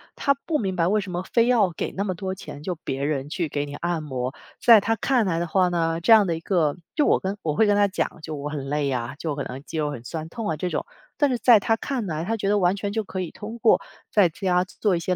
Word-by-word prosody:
他 280 - +2
不 310 -3 0
明 190 -3 -2
白 170 -1 +2
为 210 +2 +2
什 190 -2 -5
么 180 +1 -3
非 235 0 +4
要 220 -8 +3
给 - - -4
那 200 - -1
么 190 -3 -1
多 190 +1 -4
钱， 145 -6 -9
就 180 +2 -3
别 140 -3 -4
人 145 -1 -1
去 170 0 -2
给 145 0 -2
你 145 - -8
按 170 0 -2
摩。 130 -2 -3 0.3
在 230 -4 +7
他 225 +2 +1
看 250 -3 +2
来 165 -3 0
的 175 - -2
话 185 +1 +2
呢， 165 -1 0
这 210 - +2
样 210 -4 +8
的 165 - 0
一 165 - -7
个 165 -6 +1 0.2
就 300 - +3
我 - - +4
跟 195 +2 -3
我 150 -2 -1
会 220 - +4
跟 205 - +3
他 205 0 +4
讲， 190 - -3
就 155 -1 -5
我 145 +1 -5
很 145 -3 -5
累 145 -1 0
啊， 125 +2 -3
就 155 -2 -3
可 140 -1 -3
能 130 +3 -7
肌 160 - -7
肉 150 -1 0
很 120 -4 -7
酸 160 +5 -5
痛 220 +3 -4
啊 155 - -1
这 180 +3 -2
种， - - -2 0.3
但 290 -2 +3
是 250 - 0
在 235 0 +7
他 225 +2 +1
看 255 -5 -3
来， 160 -1 -3
他 225 +2 0
觉 200 -2 -2
得 205 - +3
完 180 +1 +3
全 200 0 -3
就 220 +1 0
可 190 -1 -4
以 175 - -5
通 220 +3 -8
过 225 - +4 0.3
在 200 -4 +5
家 180 +2 0
做 185 -1 0
一 - - -2
些 180 +2 -1
180 Hz, 315 characters per minute, -24 LUFS, 155-205 Hz, 0.3 s, 样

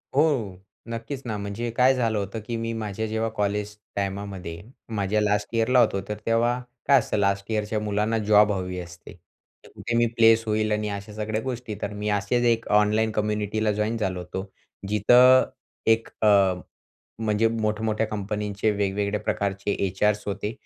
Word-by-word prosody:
हो, 135 - +2 0.3
नक्कीच 115 +4 -5
ना. 110 -3 -3
म्हणजे 100 +4 -4
काय 130 +1 +6
झालं 115 -3 0
होतं 100 +2 -3
की 120 - -3
मी 115 0 -3
माझ्या 110 -1 -3
जेव्हा 110 +1 -1
कॉलेज 105 0 -1 0.2
टाइमामध्ये 95 -4 -4 0.3
माझ्या 100 +1 +1
लास्ट 105 0 +1
इयरला 125 +3 +3
होतो, 100 -4 +3
तर 105 - -3
तेव्हा 120 +2 +2 0.3
काय 140 -2 +7
असतं, - - -2
लास्ट 100 +1 0
इयरच्या 105 0 -1
मुलांना 105 +2 0
जॉब 105 0 +6
हवी 90 -2 -3
असते, 85 0 -10 0.6
कुठे 120 - -3
मी 120 - +4
प्लेस 115 0 +6
होईल 110 0 0
आणि 105 0 0
अशा 100 +1 -6
सगळ्या 110 +1 -2
गोष्टी. 125 -3 -5
तर 105 0 -3
मी 105 +1 -3
असेच 105 +4 +1
एक 115 0 +2
ऑनलाईन 110 +1 +2
कम्युनिटीला 105 0 0
जॉइन 105 +2 -1
झालो 95 -4 -2
होतो, 90 +2 -5 0.5
जिथे 105 +4 +5 0.7
एक 115 0 +2
अ, 110 - +4 0.9
म्हणजे 110 0 +2
मोठमोठ्या 110 0 -1
कंपनीचे 105 0 -2
वेगवेगळ्या 100 0 -1
प्रकारचे 100 -1 -1
एचआर्स 105 +2 +1
होते, 105 +2 -3
105 Hz, 155 wpm, -25 LUFS, 100-115 Hz, 0.9 s, काय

